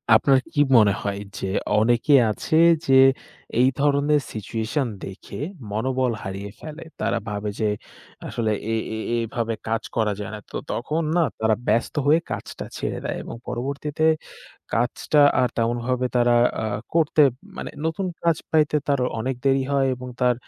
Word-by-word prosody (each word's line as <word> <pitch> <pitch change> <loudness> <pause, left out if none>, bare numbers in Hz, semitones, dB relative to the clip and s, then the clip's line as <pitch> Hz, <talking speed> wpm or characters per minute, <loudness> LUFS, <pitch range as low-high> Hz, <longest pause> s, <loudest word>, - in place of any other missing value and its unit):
আপনার 135 +3 +5
কি 145 - +3 0.2
মনে 105 -3 +5
হয় 100 0 -3 0.2
যে, - - -3 0.3
অনেকে 120 +6 +3 0.2
আছে 155 +8 -1 0.3
যে, 135 - +5 0.7
এই 130 - +5
ধরনের 145 +1 +3
situation 110 +5 -2 0.2
দেখে 95 +5 -9 0.3
মনোবল 130 +3 0
হারিয়ে 100 +1 -5
ফেলে। 155 +1 -8 0.2
তারা - - 0
ভাবে 105 0 -3
যে, 110 -2 +2 0.6
আসলে 110 -2 -1 0.2
এ - - +2 0.2
এ - - -4 0.2
এভাবে 115 0 -2
কাজ 115 0 -1
করা 110 -2 +2
যায় 105 - -5
না। - - -7
তো - - -3
তখন 150 +7 -1 0.2
না - - +4 0.2
তারা 110 -1 +3
ব্যস্ত 115 - +1
হয়ে 155 +3 +6
কাজটা - - -5
ছেড়ে - - -3
দেয় - - -2
এবং - - -7
পরবর্তীতে 140 +5 -3 0.7
কাজটা 120 +5 +1 0.2
আর 125 - +3
তেমনভাবে 120 +2 0
তারা 120 0 +4 0.3
আ - - -2 0.3
করতে 155 -2 +4 0.4
মানে - - -5 0.2
নতুন 180 +4 -2 0.2
কাজ 170 -2 +3
পাইতে 150 -1 +3
তার 140 -2 +2 0.2
অনেক 130 +2 -2
দেরি 135 0 +3
হয় 135 -1 +3
এবং 125 0 -8
তার 125 -1 +4
125 Hz, 155 wpm, -23 LUFS, 110-145 Hz, 0.7 s, হয়ে